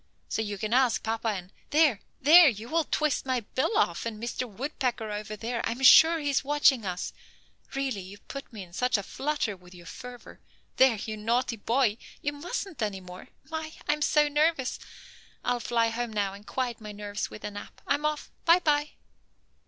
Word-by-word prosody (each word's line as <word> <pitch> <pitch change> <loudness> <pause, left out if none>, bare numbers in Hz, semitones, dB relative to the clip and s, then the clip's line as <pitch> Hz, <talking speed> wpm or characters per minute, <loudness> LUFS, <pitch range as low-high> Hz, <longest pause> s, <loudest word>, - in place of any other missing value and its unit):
So - - -1
you 205 -2 -3
can 215 +3 -3
ask 250 -2 +3
papa 225 +1 -2
and 190 -4 -3 0.2
there, 295 -8 +4 0.2
there! 315 +3 +8
You 225 0 -6
will 325 +1 +1
twist 305 -3 0
my 255 -2 0
bill 260 - -1
off, 435 - +1
and 225 -2 -5
Mr. 235 +2 -3
Woodpecker 245 -1 -3
over 210 0 -5
there, 230 +2 -3
I 230 - 0
am 260 +3 -8
sure 320 +5 +8
is 285 -2 0
watching 270 -6 +3
us. 180 0 -4 0.6
Really 270 -7 -1
you 190 +2 -10
put 275 +6 -9
me 215 -4 -7
in 175 -1 -16
such 250 +4 +1
a 200 - -4
flutter 275 -3 -2
with 180 0 -16
your 175 -1 -13
fervor. 245 +7 -10 0.4
There, 260 -3 +6
you 215 +1 -5
naughty 235 +3 0
boy; 230 0 +1 0.2
you 290 - -2
mustn't 350 - -5
any 205 -3 -1
more. 180 0 -11 0.2
My! 315 0 -4
I 295 - +4
am 300 - -5
so 300 0 +4
nervous. 295 -2 +1 0.7
I'll 245 0 +1
fly 230 -1 +1
home 235 +1 -3
now 200 -2 -1
and 200 +2 -13
quiet 245 -3 -3
my 210 -1 -7
nerves 205 0 -4
with 215 - -11
a 210 - -4
nap. 205 - -10
I'm 290 - 0
off. 300 0 -2
By 335 +1 +6
by." 300 -4 +1
240 Hz, 195 wpm, -28 LUFS, 210-290 Hz, 0.7 s, there